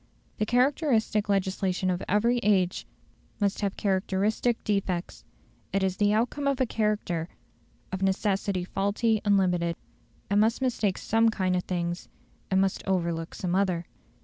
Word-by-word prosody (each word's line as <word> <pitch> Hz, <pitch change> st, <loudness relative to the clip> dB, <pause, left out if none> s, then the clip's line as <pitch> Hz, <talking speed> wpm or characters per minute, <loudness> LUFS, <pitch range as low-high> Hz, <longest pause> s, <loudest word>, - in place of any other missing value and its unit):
The 215 Hz, -, 0 dB
characteristic 245 Hz, -5 st, +2 dB
legislation 190 Hz, -1 st, 0 dB
of 180 Hz, -, -2 dB
every 235 Hz, +5 st, +3 dB
age 190 Hz, -5 st, +1 dB, 0.5 s
must 200 Hz, 0 st, 0 dB
have 200 Hz, -2 st, -1 dB
characteristic 200 Hz, +4 st, 0 dB
defects; 190 Hz, -4 st, -2 dB, 0.5 s
it 195 Hz, +1 st, +1 dB
is 190 Hz, -1 st, 0 dB
the 205 Hz, 0 st, +3 dB
outcome 245 Hz, +6 st, 0 dB
of 275 Hz, -1 st, +1 dB
a 260 Hz, -, +3 dB
character, 210 Hz, -7 st, -1 dB, 0.6 s
of 190 Hz, 0 st, -4 dB
necessity 195 Hz, -1 st, 0 dB
faulty 205 Hz, +3 st, 0 dB
and 205 Hz, -2 st, +4 dB
limited. 175 Hz, -3 st, +1 dB, 0.6 s
It -, -, +3 dB
must 220 Hz, +2 st, +3 dB
mistake 230 Hz, -7 st, 0 dB
some 225 Hz, +1 st, +2 dB
kind 185 Hz, -4 st, 0 dB
of 180 Hz, -, -1 dB
things; 175 Hz, -1 st, -3 dB, 0.4 s
it 190 Hz, -, 0 dB
must 190 Hz, 0 st, +2 dB
overlook 170 Hz, -3 st, -1 dB
some 180 Hz, -2 st, -2 dB
other. 185 Hz, -3 st, +1 dB
195 Hz, 145 wpm, -27 LUFS, 185-215 Hz, 0.6 s, and